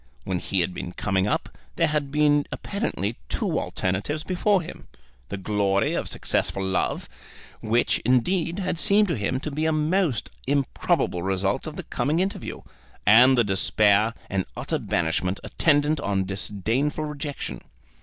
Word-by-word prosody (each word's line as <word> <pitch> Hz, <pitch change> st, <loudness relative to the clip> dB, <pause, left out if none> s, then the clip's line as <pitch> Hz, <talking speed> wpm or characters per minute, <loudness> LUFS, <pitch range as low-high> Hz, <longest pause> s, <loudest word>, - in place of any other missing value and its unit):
When 95 Hz, -2 st, -2 dB
he 95 Hz, 0 st, 0 dB
had 90 Hz, +1 st, -1 dB
been 90 Hz, -, -6 dB
coming 95 Hz, 0 st, 0 dB
up, -, -, -2 dB, 0.2 s
there 165 Hz, -, +3 dB
had 150 Hz, -3 st, -1 dB
been 145 Hz, -1 st, +3 dB
apparently 120 Hz, -, -3 dB
two -, -, 0 dB
alternatives 100 Hz, +12 st, -2 dB
before 185 Hz, +1 st, +1 dB
him: -, -, -10 dB, 0.4 s
the 100 Hz, -, -4 dB
glory 100 Hz, 0 st, +1 dB
of -, -, -2 dB
successful 95 Hz, -, -1 dB
love, 95 Hz, -1 st, -1 dB, 0.5 s
which, 115 Hz, +3 st, +1 dB
indeed, 165 Hz, -, +1 dB
had 185 Hz, -4 st, -2 dB
seemed 210 Hz, +1 st, +4 dB
to 165 Hz, -, +1 dB
him 110 Hz, +5 st, -1 dB
to 155 Hz, -, -4 dB
be 155 Hz, +3 st, -1 dB
a -, -, +2 dB
most 155 Hz, -, 0 dB, 0.2 s
improbable 135 Hz, -9 st, 0 dB
result 95 Hz, -, -1 dB
of 155 Hz, -, -6 dB
the 185 Hz, -, -6 dB
coming 145 Hz, +2 st, -1 dB
interview, 190 Hz, +2 st, -3 dB, 0.4 s
and 125 Hz, +5 st, +7 dB
the 120 Hz, -, +5 dB
despair 105 Hz, +2 st, +3 dB
and 95 Hz, -1 st, -1 dB
utter -, -, -2 dB
banishment 90 Hz, +4 st, -1 dB
attendant 150 Hz, -1 st, +2 dB
on 100 Hz, -4 st, 0 dB
disdainful 110 Hz, +10 st, -1 dB
rejection. 145 Hz, -1 st, -5 dB
125 Hz, 150 wpm, -25 LUFS, 100-155 Hz, 0.5 s, and